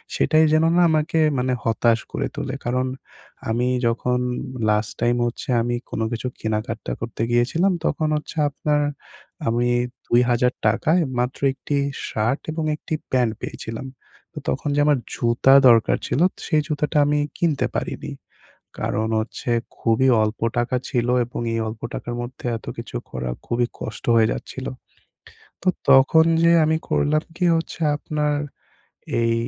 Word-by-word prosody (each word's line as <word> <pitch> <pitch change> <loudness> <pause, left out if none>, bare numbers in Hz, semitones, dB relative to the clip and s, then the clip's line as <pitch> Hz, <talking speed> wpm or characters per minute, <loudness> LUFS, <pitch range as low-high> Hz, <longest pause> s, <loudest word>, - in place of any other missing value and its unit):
সেটাই 155 +1 +4
যেন 155 +1 +4
না 175 - +5
আমাকে 160 +1 +1 0.2
মানে 125 0 0
হতাশ 115 0 +2
করে - - -2
তোলে। 140 -2 -4
কারণ 125 +1 0 0.6
আমি 120 +2 +1 0.2
যখন 125 +2 0 0.5
লাস্ট 105 0 +1
টাইম 120 0 +3
হচ্ছে 120 +2 -5
আমি 120 +1 -1
কোনো 115 - -2
কিছু 115 +2 -3
কেনাকাটা 110 +1 -3
করতে 115 -1 -5
গিয়েছিলাম 135 +11 +2
তখন 155 - 0
হচ্ছে 150 +1 -5
আপনার 150 +1 0 0.7
আমি 120 +2 +1 0.4
৳২০০০ 120 +2 +2
য় - - +1
মাত্র 125 +1 -1
একটি 145 +2 -4 0.3
শার্ট 115 +6 -1
এবং 160 0 -3
একটি 155 - -7 0.2
প্যান্ট 125 -4 +2
পেয়েছিলাম। 115 +3 -6 0.5
তো - - -16
তখন - - -1
যে - - +2
আমার 150 -2 +4 0.2
জুতা 120 +3 +3 0.2
দরকার 115 -2 +4
ছিল 145 - 0 0.2
সেই 155 -3 +2
জুতাটা 150 0 -1
আমি 150 +1 +2 0.2
কিনতে 160 -5 +1
পারিনি। 150 - -3 0.7
কারণ 110 +1 -1
হচ্ছে 115 +2 -5 0.3
খুবই 115 +3 +2
অল্প 110 +1 -2 0.2
টাকা 120 +2 0
ছিল 120 -1 0 0.2
এবং 120 +1 -6
এই 115 - 0
অল্প 110 0 -7
টাকার 120 - -4
মধ্যে 125 +1 -8
এত 110 - -11
কিছু - - -7
করা 65 -1 -4 0.2
খুবই 120 0 +1
কষ্ট - - -6
হয়ে 110 -1 +4
যাচ্ছিল। 130 - -6 1.0
তো 185 - +1 0.2
তখন 135 +5 +6 0.2
যে 170 - +5
আমি 160 +1 +2
করলাম 155 +1 +2
কি 180 - -1
হচ্ছে 165 +1 -4 0.2
আপনার 150 0 -1 0.9
এই 115 0 +2
125 Hz, 145 wpm, -22 LUFS, 115-150 Hz, 1.0 s, তখন